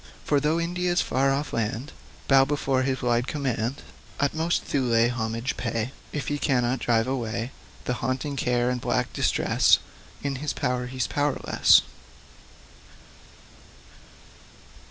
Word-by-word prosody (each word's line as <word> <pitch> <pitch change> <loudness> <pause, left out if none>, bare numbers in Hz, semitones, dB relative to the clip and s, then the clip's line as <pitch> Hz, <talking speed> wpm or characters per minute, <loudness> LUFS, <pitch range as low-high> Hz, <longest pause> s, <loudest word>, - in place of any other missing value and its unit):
For, 145 - +3
though 155 +3 +1
India's 175 +1 0
far 135 +1 +1
off 140 +2 -2
land 115 +5 -2 0.4
Bow 135 -1 +6
before 135 -2 0
his 130 -1 -1
wide 120 0 +1
command, 135 -2 -2 0.4
Utmost 160 +4 0
Thule 120 -4 +2
homage 115 0 -2
pay 115 0 -2 0.2
If 145 - -4
he 145 0 -1
cannot 125 -2 +1
drive 115 -2 +2
away 120 -2 -2 0.4
Haunting 130 +3 -2
care 125 -1 +1
and 125 -1 -3
black - - -1
distress, - - +3 0.5
In 140 -2 -2
his 150 +2 -2
power, 125 -3 -1
he's 130 -2 -2
powerless. 145 +2 +3
130 Hz, 120 wpm, -26 LUFS, 120-145 Hz, 0.5 s, Bow